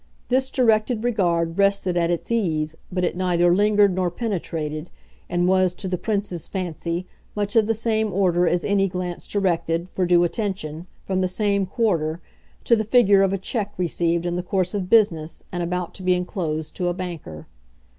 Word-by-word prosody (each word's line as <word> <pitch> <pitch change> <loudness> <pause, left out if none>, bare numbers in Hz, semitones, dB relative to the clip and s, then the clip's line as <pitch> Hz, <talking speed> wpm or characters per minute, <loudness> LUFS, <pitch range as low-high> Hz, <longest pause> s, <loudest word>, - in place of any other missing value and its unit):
This 260 +1 +2
directed 225 -2 +2
regard 175 -7 0
rested 195 -2 +2
at 170 -1 +2
its 175 +6 -2
ease, 160 -9 0 0.2
but 180 0 -1
it 175 - 0
neither 175 -1 +2
lingered 205 -1 +4
nor 185 -1 0
penetrated, 165 -6 -4 0.4
and 175 0 +1
was, 185 -1 +3
to 190 - -5
the 185 - -1
Prince's 185 -3 -3
fancy, 175 -1 -3 0.3
much 205 +1 -2
of 220 -2 +4
the 225 - +1
same 220 -1 0
order 180 -2 +2
as 175 0 +1
any 200 -1 +2
glance 180 -1 -5
directed, 170 -3 0
for 185 -1 -1
due 175 0 +5
attention, 175 -4 -3 0.2
from 190 -1 -1
the 185 - +2
same 200 0 0
quarter, 170 -7 0 0.4
to 235 - +4
the 220 - 0
figure 210 -3 +5
of 195 -1 +3
a 195 - 0
cheque 205 +1 -3
received 170 -1 0
in 175 0 -1
the - - -1
course 185 0 -1
of 190 -3 -3
business 165 -8 +2
and 175 - -3
about 180 0 -3
to - - -11
be 185 0 +3
enclosed 165 -4 -3
to 180 - -1
a 175 - 0
banker. 170 - -7
185 Hz, 185 wpm, -23 LUFS, 175-205 Hz, 0.4 s, due